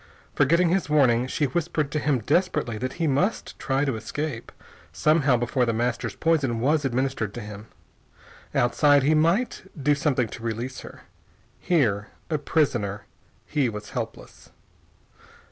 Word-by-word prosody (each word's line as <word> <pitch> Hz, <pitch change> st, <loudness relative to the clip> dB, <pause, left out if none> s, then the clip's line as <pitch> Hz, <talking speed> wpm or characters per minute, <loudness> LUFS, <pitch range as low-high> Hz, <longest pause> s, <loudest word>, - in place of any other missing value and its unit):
Forgetting 170 Hz, +4 st, +3 dB
his 185 Hz, -2 st, 0 dB
warning, 130 Hz, -5 st, +3 dB
she 145 Hz, -, 0 dB
whispered 155 Hz, 0 st, -1 dB
to 155 Hz, -, 0 dB
him 145 Hz, -5 st, +1 dB
desperately 145 Hz, -, 0 dB
that 130 Hz, +2 st, -3 dB
he 170 Hz, -, -2 dB
must 155 Hz, +9 st, -1 dB
try 135 Hz, +1 st, 0 dB
to 135 Hz, -4 st, -1 dB
escape, 145 Hz, +2 st, -5 dB, 0.4 s
somehow, 150 Hz, -5 st, +3 dB
before 120 Hz, +2 st, 0 dB
The 115 Hz, -1 st, +1 dB
Master's 120 Hz, +2 st, -2 dB
poison 145 Hz, -8 st, +1 dB
was 145 Hz, +5 st, +2 dB
administered 130 Hz, -5 st, -1 dB
to -, -, -4 dB
him. 105 Hz, 0 st, -9 dB, 0.9 s
Outside, 145 Hz, +3 st, +4 dB
he 150 Hz, +3 st, +3 dB
might 170 Hz, +10 st, +2 dB, 0.2 s
do 145 Hz, +1 st, +3 dB
something 140 Hz, -5 st, +1 dB
to 115 Hz, -, -9 dB
release 115 Hz, +3 st, -4 dB
her. -, -, -11 dB, 0.6 s
Here, 110 Hz, -, +1 dB, 0.2 s
a 155 Hz, -, +1 dB
prisoner, 120 Hz, -10 st, 0 dB, 0.4 s
he 140 Hz, -5 st, 0 dB
was 105 Hz, -1 st, -8 dB
helpless. -, -, -7 dB
135 Hz, 145 wpm, -25 LUFS, 120-155 Hz, 0.9 s, Outside